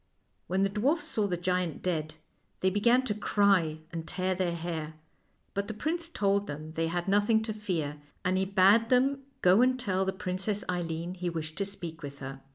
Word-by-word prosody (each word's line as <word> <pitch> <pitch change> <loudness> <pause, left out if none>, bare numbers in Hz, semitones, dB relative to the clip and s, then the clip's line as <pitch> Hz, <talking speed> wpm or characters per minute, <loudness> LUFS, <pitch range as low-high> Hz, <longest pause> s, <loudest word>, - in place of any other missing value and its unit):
When 190 +2 +1
the 195 - +2
dwarfs 275 - +1
saw 215 -9 +1
the 180 -2 -1
giant 180 -2 -1
dead 155 -4 -1 0.5
they 190 - +3
be 205 - 0
gan 245 +4 +4
to 225 - -1
cry 195 -7 +2
and 165 -1 -5
tear 185 0 0
their 180 -2 -1
hair. 160 -2 -4 0.6
But 200 0 -2
the 220 - -5
prince 330 +8 -1
told 200 -6 +1
them 155 0 -6
they 165 0 -1
had 175 +2 -2
nothing 205 +3 +3
to 220 -1 -3
fear, 165 -9 -3 0.2
and 185 0 +2
he 190 0 +2
bade 200 +4 +5
them 270 +2 +3 0.2
go 185 +5 +6
and 255 0 +3
tell 190 -5 0
the 190 - 0
Princess 190 +2 -2
Eileen 170 -1 -2
he 180 -1 -3
wished 160 -2 -5
to 200 - +1
speak 170 -4 -7
with 140 -2 -7
her. 135 0 -7
185 Hz, 200 wpm, -29 LUFS, 165-210 Hz, 0.6 s, go